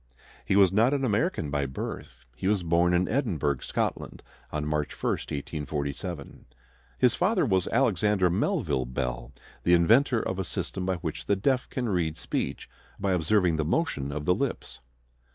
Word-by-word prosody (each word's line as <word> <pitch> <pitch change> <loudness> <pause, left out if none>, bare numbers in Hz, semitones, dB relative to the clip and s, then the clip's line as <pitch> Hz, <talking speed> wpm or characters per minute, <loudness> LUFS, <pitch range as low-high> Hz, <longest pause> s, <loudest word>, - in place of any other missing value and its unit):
He - - 0
was 95 -2 +5
not 115 +7 +4
an 135 -1 0
American 105 - 0
by 70 -1 0
birth. 65 -1 -7
He 80 - -3
was 100 -3 +2
born 85 +1 +3
in 90 +1 +2
Edinburgh, 80 - 0
Scotland, - - -3 0.3
on 75 -1 -2
March 75 -1 -1
1, - - +1
1847. 75 +2 -4 0.5
His 125 -2 +4
father 190 +2 +2
was 95 -3 +1
Alexander 105 -6 +2
Melville 65 -7 0
Bell, 60 0 -3 0.3
the 85 - +3
inventor 115 +8 +4
of 95 -3 -3
a - - 0
system 90 +1 -4
by 95 - +1
which 85 -3 -5
the 100 - +3
deaf 125 +6 0
can 125 -2 -2
read 85 -6 0
speech - - -3 0.3
by 100 - 0
observing 90 0 +2
the 80 - +1
motion 75 - -1
of 75 +1 -4
the 90 - +4
lips. - - -3
90 Hz, 165 wpm, -27 LUFS, 75-105 Hz, 0.5 s, was